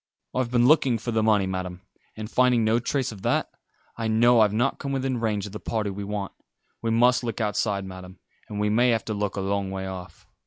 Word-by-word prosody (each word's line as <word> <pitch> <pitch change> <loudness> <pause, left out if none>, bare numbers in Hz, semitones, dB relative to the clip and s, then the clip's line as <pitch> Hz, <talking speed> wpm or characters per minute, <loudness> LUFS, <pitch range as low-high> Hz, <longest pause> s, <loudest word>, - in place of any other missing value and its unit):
I've 130 -2 0
been 120 0 +3
looking 135 -4 +4
for 120 +2 -4
the 110 -1 +1
money, 105 -3 +3
Madam, 95 -1 -4 0.4
and 110 0 -5
finding 125 0 +3
no 110 +2 +3
trace 130 +1 -1
of 105 -3 -10
that, - - 0 0.5
I 115 -1 -2
know 120 +2 +4
I've 105 -2 +5
not 120 +5 0
come 140 -1 -3
within 130 -2 -1
range 105 -3 -1
of 105 - -8
the 105 - -7
party 105 -3 -2
we 100 +1 -6
want. 100 -1 -4 0.5
We 115 - -1
must 125 +2 +4
look 115 -2 -3
outside, 105 -2 -1
Madam, 95 0 -10 0.3
and 105 - -5
we 105 0 +1
may 120 +3 +4
have 115 -2 +1
to 110 - -3
look 105 -1 -2
a 100 - -2
long 100 0 -1
way 95 0 -4
off. 90 -3 -8
110 Hz, 230 wpm, -25 LUFS, 100-120 Hz, 0.5 s, I've